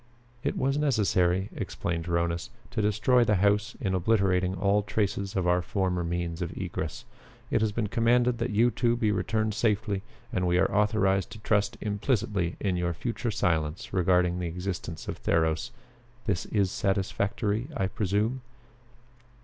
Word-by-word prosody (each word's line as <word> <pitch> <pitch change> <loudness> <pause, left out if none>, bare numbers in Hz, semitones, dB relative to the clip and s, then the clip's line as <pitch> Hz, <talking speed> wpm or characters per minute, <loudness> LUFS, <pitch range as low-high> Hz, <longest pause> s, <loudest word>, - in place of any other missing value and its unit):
"It - - -1
was 135 +2 +1
necessary," 95 -9 +2
explained 85 -1 -3
Rhonus, 85 +2 -1 0.2
"to 110 - -1
destroy 110 +4 +3
the 105 -2 +2
house 105 +3 +2
in 95 -3 -1
obliterating 95 -1 +2
all 100 +2 +2
traces 100 -1 -2
of 95 -2 0
our 90 0 +3
former 90 -1 -1
means 85 0 -3
of 85 - -2
egress. - - -4 0.5
It - - +2
has 110 -1 +2
been 110 +1 -1
commanded 120 +2 +2
that 120 +2 -1
you 115 +3 +3
two 120 +1 +1
be 110 -3 +1
returned 110 +2 0
safely, 105 -2 0 0.3
and 90 -1 +1
we 90 0 +3
are 95 - +2
authorized 105 -2 +2
to 110 - -10
trust 105 -1 +1
implicitly 100 -4 0
in 95 -3 0
your 85 -1 -1
future 120 +5 -3
silence 80 -6 -1
regarding 90 -1 +2
the 90 - -2
existence 90 -1 -5
of - - -5
Theros. 80 +7 +1 0.6
This 85 - -1
is 100 -4 +1
satisfactory, 100 +4 -1
I 95 - +1
presume?" 105 +6 0
100 Hz, 155 wpm, -28 LUFS, 90-110 Hz, 0.6 s, destroy